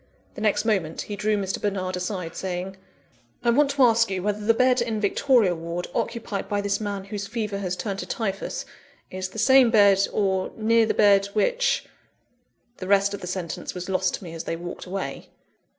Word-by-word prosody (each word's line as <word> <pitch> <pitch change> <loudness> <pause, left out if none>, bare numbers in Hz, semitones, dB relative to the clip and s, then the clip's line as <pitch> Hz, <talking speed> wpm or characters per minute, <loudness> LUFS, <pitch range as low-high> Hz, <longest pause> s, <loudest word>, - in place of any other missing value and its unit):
The - - -8
next 215 0 +1
moment 190 -8 0
he 205 - -5
drew 210 +1 0
Mr. 195 -1 -3
Bernard 190 -3 -2
aside, 180 -2 -4
saying: 185 0 -4 0.7
"I 235 - +4
want 280 +4 +3
to 275 -1 +2
ask 230 -2 +4
you 185 -2 -3
whether 210 +1 -1
the 225 +2 +3
bed 255 0 +3
in 225 -2 -1
Victoria 215 -1 +3
Ward, 170 +1 -4
occupied 225 -4 -3
by 205 - 0
this 200 +1 -1
man 200 -2 -3
whose 200 0 -5
fever 210 -2 -3
has 185 -2 -2
turned 195 +1 -4
to - - -5
typhus, 195 -4 -3 0.5
is 185 0 -4
the 190 - -11
same 260 +2 +6
bed, 200 -3 +5
or 190 -2 0
near 225 0 +3
the - - 0
bed 200 -1 +5
which - - +1 0.5
" 245 0 -44
The 185 - -6
rest 200 0 +3
of 200 - -6
the 180 - -6
sentence 180 -1 -5
was 180 +1 -6
lost 185 -1 +1
to - - -11
me 165 -2 -8
as 165 - -6
they - - -2
walked 175 +2 -7
away. 185 -7 -5
200 Hz, 200 wpm, -24 LUFS, 185-225 Hz, 0.7 s, same